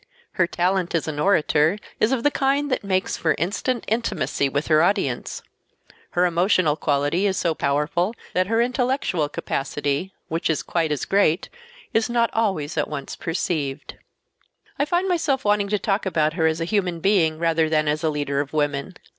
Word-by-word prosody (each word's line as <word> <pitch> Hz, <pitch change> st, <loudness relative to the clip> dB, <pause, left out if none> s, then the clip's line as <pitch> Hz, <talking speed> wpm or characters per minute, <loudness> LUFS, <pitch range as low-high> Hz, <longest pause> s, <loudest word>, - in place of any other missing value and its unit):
Her 185 Hz, -, +1 dB
talent 180 Hz, 0 st, 0 dB
as 165 Hz, -, 0 dB
an 150 Hz, -2 st, -3 dB
orator 160 Hz, -1 st, +3 dB, 0.2 s
is 215 Hz, -, +3 dB
of 255 Hz, -3 st, 0 dB
the 290 Hz, -, +3 dB
kind 280 Hz, +1 st, +1 dB
that 255 Hz, -, 0 dB
makes 190 Hz, -1 st, 0 dB
for 160 Hz, -2 st, +1 dB
instant 215 Hz, -, -1 dB
intimacy 210 Hz, -10 st, 0 dB
with 145 Hz, +3 st, -1 dB
her 155 Hz, -1 st, +4 dB
audience. 170 Hz, -, 0 dB, 0.7 s
Her 180 Hz, -, +5 dB
emotional 175 Hz, -2 st, +2 dB
quality 145 Hz, +6 st, +1 dB
is 190 Hz, -2 st, -1 dB
so 170 Hz, -2 st, +1 dB
powerful 160 Hz, +9 st, 0 dB, 0.2 s
that 185 Hz, 0 st, +1 dB
her 225 Hz, +2 st, +1 dB
intellectual 245 Hz, -, 0 dB
capacity, 145 Hz, +5 st, -2 dB, 0.2 s
which 165 Hz, +1 st, -2 dB
is 160 Hz, -, 0 dB
quite 165 Hz, -3 st, -1 dB
as 150 Hz, -, -1 dB
great, 195 Hz, -3 st, +2 dB, 0.4 s
is 225 Hz, +1 st, +2 dB
not 235 Hz, -1 st, +1 dB
always 190 Hz, -10 st, -1 dB
at 150 Hz, -, 0 dB
once 140 Hz, -2 st, -5 dB
perceived. 155 Hz, -4 st, -3 dB, 0.9 s
I 285 Hz, -, +3 dB
find 350 Hz, +5 st, 0 dB
myself 315 Hz, -, 0 dB
wanting 205 Hz, -1 st, +2 dB
to 210 Hz, -, +1 dB
talk 200 Hz, 0 st, -1 dB
about 155 Hz, -4 st, +1 dB
her 165 Hz, -2 st, +2 dB
as 160 Hz, 0 st, 0 dB
a 165 Hz, -, -1 dB
human 180 Hz, -3 st, 0 dB
being 165 Hz, -4 st, +2 dB
rather 165 Hz, -1 st, +1 dB
than 155 Hz, -1 st, +1 dB
as 150 Hz, +2 st, 0 dB
a 160 Hz, -, +2 dB
leader 145 Hz, -2 st, -1 dB
of 140 Hz, 0 st, -3 dB
women. 145 Hz, +3 st, -1 dB
170 Hz, 180 wpm, -23 LUFS, 155-205 Hz, 0.9 s, Her